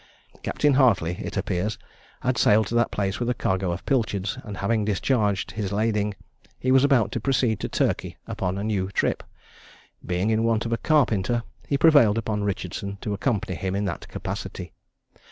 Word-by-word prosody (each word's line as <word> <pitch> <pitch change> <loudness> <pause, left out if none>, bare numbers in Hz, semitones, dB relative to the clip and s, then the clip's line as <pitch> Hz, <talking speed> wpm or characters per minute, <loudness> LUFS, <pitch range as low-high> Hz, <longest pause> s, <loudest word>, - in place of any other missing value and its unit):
Capt. - - -5
Hartley, 125 - +3
it - - -5
appears, 95 +5 -1 0.4
had 130 0 +1
sailed 110 -2 +4
to 110 - -6
that 120 -1 +3
place 100 -1 -2
with 120 0 -1
a 125 - +1
cargo 95 -3 0
of 85 - -5
pilchards, 105 -7 0
and 105 -3 -7
having 110 +2 +1
discharged 105 -1 0
his 100 0 -3
lading, 105 -1 0 0.4
he 130 - 0
was 130 0 +6
about 135 -6 +3
to - - -2
proceed 120 -3 +1
to - - -3
Turkey - - -1
upon 95 0 -3
a 100 - -3
new 100 -3 -1
trip. 100 - 0 0.8
Being 90 +5 0
in 110 0 +2
want 115 0 +1
of 115 - -1
a - - +1
carpenter, 120 -7 +2 0.2
he 140 - +1
prevailed 140 -9 +6
upon 110 -2 -1
Richardson 100 0 -3
to 105 - -2
accompany 100 -3 -1
him 95 +2 -3
in 100 +1 -1
that 85 - -4
capacity. - - -6
105 Hz, 180 wpm, -25 LUFS, 100-120 Hz, 0.8 s, was